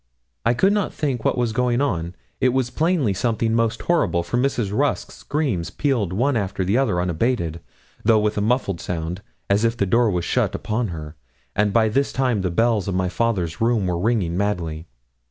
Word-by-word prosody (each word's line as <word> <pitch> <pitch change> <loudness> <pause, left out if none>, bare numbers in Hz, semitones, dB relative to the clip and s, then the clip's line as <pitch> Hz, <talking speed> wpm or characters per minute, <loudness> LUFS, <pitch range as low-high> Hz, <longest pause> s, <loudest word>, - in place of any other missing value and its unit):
I 120 - +3
could 195 +10 +3
not 205 -2 0
think 130 -7 -2
what - - +1
was 120 -2 0
going 125 0 +1
on. 90 -11 -1 0.2
It 130 -1 +2
was 130 -2 0
plainly 155 - +1
something 115 +2 0
most 115 0 0
horrible, 95 - +1
for 85 - -4
Mrs. 120 -6 0
Rusk's 145 +3 0
screams 135 - -2
pealed 125 - 0
one 125 +8 +1
after 95 -3 -1
the 100 +4 +1
other 120 -9 +2
unabated, 85 -1 -1 0.4
though 110 0 +5
with 105 0 +1
a 105 - 0
muffled 105 -6 0
sound, 85 +2 -4 0.3
as 100 +2 +2
if 115 +1 +1
the 100 - +1
door 115 +4 +3
was 90 -3 -1
shut - - 0
upon 110 +2 -1
her; 80 -3 -7 0.4
and 105 0 +2
by 110 +1 +3
this 135 +6 +1
time 125 -6 0
the 95 - 0
bells 110 +2 +1
of 95 - -1
my 90 0 0
father's 90 -7 -1
room 115 -3 +2
were 90 -2 -1
ringing 100 -5 0
madly. 85 -5 -2
110 Hz, 195 wpm, -22 LUFS, 90-125 Hz, 0.4 s, though